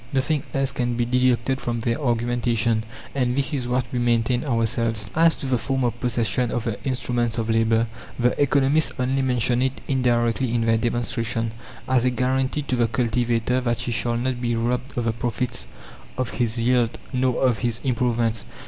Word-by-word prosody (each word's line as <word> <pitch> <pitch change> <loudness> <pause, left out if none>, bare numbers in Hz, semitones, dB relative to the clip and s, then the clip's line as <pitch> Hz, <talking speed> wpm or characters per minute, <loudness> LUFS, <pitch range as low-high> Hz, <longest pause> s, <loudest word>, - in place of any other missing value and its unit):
Nothing 135 +2 +1
else 135 0 +1
can 120 -2 -1
be 120 0 0
deducted 125 +1 +1
from 120 -1 -2
their 115 +4 -1
argumentation, 120 -2 +1 0.3
and 125 -3 0
this 140 +2 +1
is 130 -4 -1
what 125 0 0
we 125 - -1
maintain 120 0 +1
ourselves. 115 -3 0
As 165 +1 +4
to - - -6
the 130 -2 +1
form 135 +1 -1
of 120 -1 -1
possession 120 -1 0
of 115 +1 -2
the 115 -3 -4
instruments 120 -3 -1
of 115 -1 0
labour, 115 0 +3 0.3
the 125 0 +3
economists 145 +2 +2
only 130 +1 0
mention 125 -1 +1
it 130 0 -1
indirectly 120 -2 +1
in 115 -1 +1
their 115 0 +3
demonstration, 115 -1 -1 0.4
as 130 -2 +3
a 125 - +3
guarantee 130 +3 0
to 130 - -1
the 120 -1 +2
cultivator 120 +1 0
that 120 -2 -1
he 120 - -3
shall 120 0 0
not 125 0 -2
be 120 -1 0
robbed 125 +3 -2
of 120 - 0
the 115 - +1
profits 115 - -3 0.5
of 130 -3 -2
his 120 -1 -1
yield 120 0 +2 0.2
nor 125 -1 +1
of 125 -5 +2
his 115 0 -1
improvements. 120 -3 0
120 Hz, 185 wpm, -23 LUFS, 115-130 Hz, 0.5 s, As